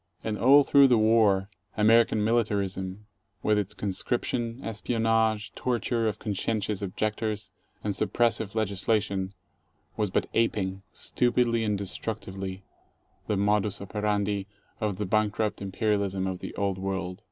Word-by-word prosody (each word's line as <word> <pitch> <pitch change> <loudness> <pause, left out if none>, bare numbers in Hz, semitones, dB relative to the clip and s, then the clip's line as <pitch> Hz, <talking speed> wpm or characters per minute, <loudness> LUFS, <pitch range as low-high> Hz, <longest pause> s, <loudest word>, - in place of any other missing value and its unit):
And 110 -1 -2
all 140 +6 +6
through 140 0 +6
the 125 -3 +4
war 110 -3 +4 0.3
American 110 0 +4
militarism, 100 -3 -1 0.4
with 105 -1 +3
its 100 -2 -4
conscription, 115 +4 -2
espionage, 115 0 0
torture 120 -2 0
of 105 -1 -1
conscientious 105 0 -2
objectors, 105 +1 -2 0.3
and 105 - -1
suppressive 110 +1 0
legislation, 100 -2 0 0.6
was 105 -2 0
but - - 0
aping— 95 -4 0
stupidly 120 -2 +1
and 105 -2 0
destructively 95 -1 -4 0.3
— 95 0 -40
the 105 - 0
modus 105 0 +1
operandi 100 -1 -1 0.3
of 105 -3 -1
the 105 - -3
bankrupt 105 +1 0
imperialism 100 -1 0
of 95 -1 -3
the - - -7
Old 100 -2 -1
World. 95 -1 -3
105 Hz, 125 wpm, -27 LUFS, 95-110 Hz, 0.6 s, all